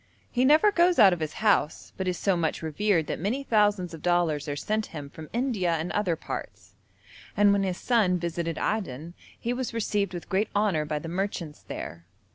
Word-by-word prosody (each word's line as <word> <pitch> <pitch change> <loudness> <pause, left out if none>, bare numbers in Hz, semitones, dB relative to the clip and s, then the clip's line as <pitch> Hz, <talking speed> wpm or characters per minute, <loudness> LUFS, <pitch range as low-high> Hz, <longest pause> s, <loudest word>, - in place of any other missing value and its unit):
He 250 +1 +2
never 310 +10 +6
goes 350 -2 +3
out 200 -5 +7
of 175 - -3
his 155 -1 -3
house, 180 -7 +1
but 190 - -3
is 180 -1 0
so 195 -2 +1
much 165 -1 -1
revered 165 +1 +1
that - - -4
many 225 - -1
thousands 205 -7 +2
of 160 - -9
dollars 170 -4 +1
are 145 - -2
sent 215 +8 -2
him 145 -3 -8
from 155 0 -10
India 225 -9 0
and 160 +2 -3
other 195 -5 0
parts, - - -7 0.6
and 205 0 +5
when 200 - +2
his 185 -2 -1
son 210 -7 +2
visited 170 -1 -3
Aden 170 -6 -3 0.3
he 240 - -1
was 245 -2 -4
received 205 -4 -1
with 175 - -7
great 195 +3 0
honour 200 -7 +2
by 150 0 -2
the 150 - -6
merchants 175 -3 -3
there. 85 +1 -8
185 Hz, 200 wpm, -27 LUFS, 160-210 Hz, 0.6 s, out